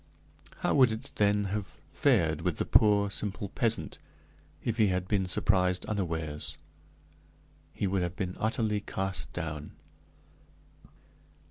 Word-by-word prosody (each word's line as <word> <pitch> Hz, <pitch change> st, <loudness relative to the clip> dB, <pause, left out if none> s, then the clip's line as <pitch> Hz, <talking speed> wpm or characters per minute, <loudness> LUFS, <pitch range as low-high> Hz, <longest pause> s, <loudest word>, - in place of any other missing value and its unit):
How -, -, +1 dB
would 130 Hz, -5 st, +5 dB
it, 110 Hz, +5 st, -6 dB
then, 105 Hz, 0 st, +3 dB
have 105 Hz, -3 st, -4 dB
fared -, -, +2 dB
with -, -, -1 dB
the -, -, -1 dB
poor, 100 Hz, -2 st, +4 dB
simple 100 Hz, 0 st, -2 dB
peasant, 115 Hz, +1 st, +1 dB, 0.6 s
if 115 Hz, -1 st, -1 dB
he 110 Hz, -, +5 dB
had 90 Hz, -1 st, -1 dB
been 95 Hz, -2 st, +1 dB
surprised 90 Hz, +1 st, +2 dB
unawares? 80 Hz, -7 st, -3 dB, 1.1 s
He -, -, -3 dB
would 95 Hz, -1 st, 0 dB
have 90 Hz, 0 st, -2 dB
been 90 Hz, -1 st, -3 dB
utterly 110 Hz, -1 st, 0 dB
cast 95 Hz, -6 st, -3 dB
down. 80 Hz, -3 st, -5 dB
100 Hz, 125 wpm, -29 LUFS, 90-105 Hz, 1.1 s, would